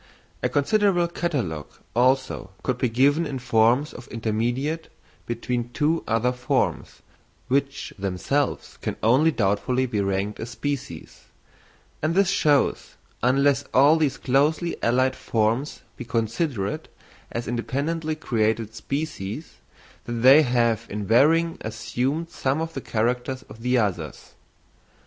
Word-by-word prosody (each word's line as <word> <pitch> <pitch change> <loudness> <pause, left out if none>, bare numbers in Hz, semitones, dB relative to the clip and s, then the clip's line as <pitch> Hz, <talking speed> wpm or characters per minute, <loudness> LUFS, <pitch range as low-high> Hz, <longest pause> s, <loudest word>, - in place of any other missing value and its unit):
A - - +1
considerable 175 +4 +2
catalogue, 130 - -3 0.3
also, 130 -4 +1
could 125 -1 -1
be 125 - +1
given 140 +7 +3
of 135 -2 -4
forms 120 +4 +3 0.2
intermediate 120 +8 -2 0.4
between 120 0 -2
two 160 +2 +1
other 115 +2 +2
forms, 125 0 -2 0.5
which 140 +1 -1
themselves 100 +9 -1
can - - -3
only 130 +8 +5
doubtfully 125 +1 +1
be 110 -5 -1
ranked 100 +1 -1
as 115 - -5
species; 125 - -5 0.8
and 155 +2 0
this 195 -1 +4
shows, 145 -7 +1 0.3
unless 135 +3 +3
all 145 +5 +6
these 145 -4 +1
closely 145 +7 +1
allied 130 +2 +2
forms 115 +5 -1 0.2
be - - -5
considered 115 - -2 0.4
as 120 +1 -4
independently 150 +7 -2
created 110 -6 -1
species, 140 0 -5 0.5
that 120 - -4
they 130 +6 +7
have 115 -4 +1
in 105 0 -4
varying 160 - +3
assumed 130 +9 -2
some 135 +3 -1
of 165 0 -3
the 135 - -4
characters 125 +4 -1
of 115 - -14
the 125 +1 +2
others. 85 - -2
125 Hz, 120 wpm, -24 LUFS, 115-145 Hz, 0.8 s, they